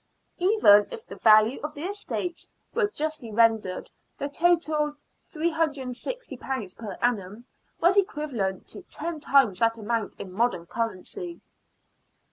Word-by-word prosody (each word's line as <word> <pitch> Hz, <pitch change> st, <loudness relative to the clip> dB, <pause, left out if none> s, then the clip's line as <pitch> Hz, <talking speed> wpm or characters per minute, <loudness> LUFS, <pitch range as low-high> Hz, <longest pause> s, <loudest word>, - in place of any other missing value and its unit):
Even 350 Hz, -, +6 dB
if 455 Hz, -2 st, -8 dB
the -, -, -10 dB
value 215 Hz, +3 st, +5 dB
of 300 Hz, +1 st, -5 dB
the 290 Hz, -, -6 dB
estates 365 Hz, -2 st, -4 dB, 0.2 s
were 450 Hz, -3 st, +2 dB
justly 310 Hz, -, -3 dB
rendered, 220 Hz, -4 st, +2 dB, 0.3 s
the 285 Hz, -, -3 dB
total, 310 Hz, -2 st, +2 dB, 0.4 s
;^36o 290 Hz, -, -3 dB
per 215 Hz, -4 st, -5 dB
annum, 220 Hz, -1 st, -1 dB, 0.3 s
was 360 Hz, +4 st, +4 dB
equivalent 275 Hz, -, -1 dB
to -, -, -7 dB
ten 330 Hz, 0 st, -4 dB
times 270 Hz, -10 st, +3 dB
that 230 Hz, 0 st, +2 dB
amount 225 Hz, 0 st, -2 dB
in 190 Hz, -, -7 dB
modem 210 Hz, -3 st, 0 dB
currency. 230 Hz, -, -4 dB
270 Hz, 120 wpm, -26 LUFS, 220-330 Hz, 0.4 s, Even